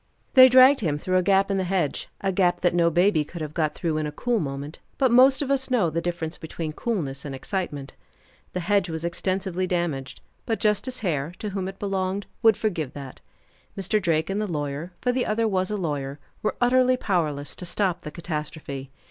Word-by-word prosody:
They 260 -1 +9
dragged 260 +2 +7
him 155 -8 0
through 185 +5 0
a - - +4
gap 195 +2 +3
in 195 - +1
the 190 - 0
hedge, 180 -5 -1
a 195 - 0
gap 175 -2 +2
that 175 - +2
no 170 -1 +3
baby 175 -1 +3
could 170 +3 -9
have 155 -1 -5
got 155 -2 0
through 160 -3 -1
in 155 -1 -1
a - - -4
cool 235 +9 0
moment; 140 -1 -5 0.2
but 260 -3 +3
most 260 +3 +6
of 275 - -2
us 270 -1 0
know 215 -10 +2
the 165 +2 -1
difference 170 -1 -4
between 160 -1 -5
coolness 150 - -3
and 140 -2 -5
excitement. 145 -3 -4 0.6
The 180 - -2
hedge 195 0 +1
was 160 0 -4
extensively 185 +1 -1
damaged, 165 -8 -2 0.3
but 225 - 0
Justice 245 +5 0
Hare, 160 -5 -1
to 210 - -4
whom 190 -1 -3
it 195 0 -7
belonged, 195 0 -2 0.2
would 225 -3 +5
forgive 170 - -2
that. 135 -2 -9 0.6
Mr. 200 +2 0
Drake 165 0 +1
and 205 +2 -1
the 210 - -1
lawyer 145 +2 -3
for 250 - +2
the 250 0 -1
other 220 +1 +1
was 185 -3 0
a 210 - -2
lawyer 145 -6 -3 0.2
were 215 - -1
utterly 255 +1 +4
powerless 155 -10 -1
to 180 - -6
stop 185 -1 -1
the 150 - -6
catastrophe. 150 -4 -5
180 Hz, 205 wpm, -25 LUFS, 155-210 Hz, 0.6 s, They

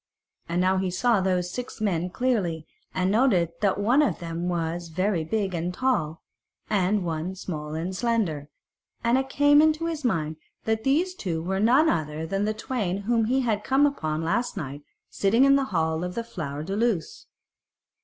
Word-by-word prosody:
And 170 +1 0
now 185 +1 +3
he 185 0 0
saw 220 +3 +2
those 180 -1 0
six 245 +4 -6
men 180 -5 0
clearly, 180 -9 -1 0.3
and 185 +1 0
noted 205 -8 +3
that 200 -3 +2
one 240 +8 +4
of 295 - +1
them 170 0 -4
was 170 0 -2
very 185 +1 0
big 195 +2 -1
and 170 +1 -2
tall, 180 -8 -1 0.5
and 195 -1 +1
one 165 +3 -3
small 155 -5 -5
and 175 +4 -3
slender, 185 -11 -1 0.5
and 235 +1 +3
it 265 0 -3
came 290 +1 +5
into 315 +1 +2
his 325 -3 -3
mind 160 -10 -1 0.3
that 220 0 -1
these 330 +7 +2
two 165 - -3
were 190 +2 -1
none 250 +9 +4
other 155 - -1
than 195 +4 -1
the 215 - 0
twain 200 -6 -2
whom 225 +2 +1
he 260 +4 +2
had 215 -4 0
come 270 +4 +3
upon 155 - -1
the - - -3
last 235 +7 -1
night 145 -4 -5 0.3
sitting 225 +6 +2
in 275 0 +6
the 275 -1 +2
hall 160 -5 -1
of 180 0 -4
the 235 - -2
Flower 160 -11 -5
de 190 +5 -3
Luce. 215 -7 -1
190 Hz, 185 wpm, -26 LUFS, 165-240 Hz, 0.5 s, in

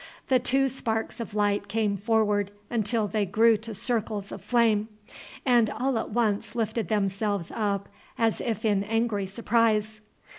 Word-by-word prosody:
The 260 -1 +5
two 265 +2 +2
sparks 230 -3 -2
of 225 -2 -6
light 205 -1 +1
came 215 -2 0
forward 205 -1 +1 0.2
until 220 -1 0
they 210 +1 0
grew 220 +4 +4
to 220 0 -7
circles 215 -2 -2
of - - -7
flame, 225 -3 +2 0.6
and 240 -4 +4
all 265 +1 -1
at - - -4
once 220 -1 0
lifted 225 0 -1
themselves 200 -3 -1
up 200 -2 -1 0.3
as 225 -1 +1
if 225 -3 -2
in 205 -2 +2
angry 220 -2 0
surprise. 215 0 +1
220 Hz, 150 wpm, -27 LUFS, 205-230 Hz, 0.6 s, The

